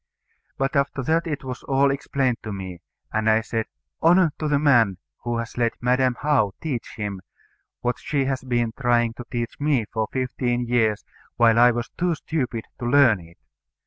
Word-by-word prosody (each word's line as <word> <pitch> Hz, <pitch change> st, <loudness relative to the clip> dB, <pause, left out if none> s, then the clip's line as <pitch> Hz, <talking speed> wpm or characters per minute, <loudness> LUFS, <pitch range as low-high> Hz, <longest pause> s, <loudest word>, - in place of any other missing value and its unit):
But 135 Hz, +2 st, -1 dB
after 140 Hz, -1 st, 0 dB
that 165 Hz, +5 st, +1 dB
it 150 Hz, -3 st, -3 dB
was 130 Hz, -1 st, -6 dB
all 135 Hz, +1 st, +2 dB
explained 135 Hz, -3 st, 0 dB
to 110 Hz, -, -6 dB
me; 95 Hz, -3 st, -7 dB, 0.3 s
and 110 Hz, 0 st, +1 dB
I 110 Hz, 0 st, +4 dB
said, 110 Hz, 0 st, -3 dB, 0.3 s
"Honour 170 Hz, 0 st, +5 dB
to 155 Hz, -, -1 dB
the 145 Hz, -1 st, +2 dB
man 120 Hz, -10 st, +4 dB, 0.2 s
who 120 Hz, -1 st, -2 dB
has 115 Hz, +1 st, -5 dB
let 115 Hz, -1 st, +2 dB
Madam 125 Hz, 0 st, +2 dB
How 125 Hz, -10 st, +2 dB
teach 135 Hz, -7 st, -4 dB
him 105 Hz, -3 st, -4 dB, 0.6 s
what 120 Hz, 0 st, -1 dB
she 140 Hz, -3 st, -1 dB
had 135 Hz, -1 st, -1 dB
been 120 Hz, -2 st, +1 dB
trying 120 Hz, -3 st, +2 dB
to 120 Hz, +1 st, -9 dB
teach 120 Hz, -1 st, -4 dB
me 145 Hz, -6 st, +1 dB
for 110 Hz, -1 st, 0 dB
fifteen 125 Hz, -1 st, -1 dB
years, 115 Hz, -3 st, +1 dB, 0.3 s
while 115 Hz, -1 st, +5 dB
I 120 Hz, +1 st, +8 dB
was 120 Hz, -1 st, -2 dB
too 175 Hz, -1 st, -1 dB
stupid 130 Hz, -9 st, -3 dB
to 120 Hz, -, -4 dB
learn 120 Hz, -6 st, +5 dB
it. 85 Hz, 0 st, -16 dB
120 Hz, 180 wpm, -24 LUFS, 115-140 Hz, 0.6 s, I